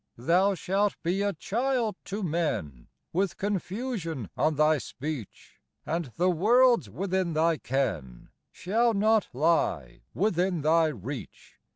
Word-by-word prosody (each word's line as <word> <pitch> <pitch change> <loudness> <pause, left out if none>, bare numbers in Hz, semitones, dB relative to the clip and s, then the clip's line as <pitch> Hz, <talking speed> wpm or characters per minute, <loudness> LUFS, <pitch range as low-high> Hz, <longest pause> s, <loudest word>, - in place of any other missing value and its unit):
"Thou 180 +10 +2
shalt 195 +3 0
be 180 +4 0
a 200 0 +1
child 235 - -1
to 200 +2 -4
men, 150 - -2 0.3
With 190 +2 0
confusion 195 - -3
on 155 0 +1
thy 155 +1 +3
speech; 135 -4 -7 0.2
And 165 +1 -1
the 180 +2 +3
worlds 235 - +4
within 185 - -1
thy 160 +1 +2
ken 90 - -3 0.2
Shall 225 +5 +1
not 215 +1 +3
lie 125 - 0
within 180 -3 +1
thy 160 +2 +4
reach. 140 -5 -8
175 Hz, 120 wpm, -28 LUFS, 150-200 Hz, 0.3 s, worlds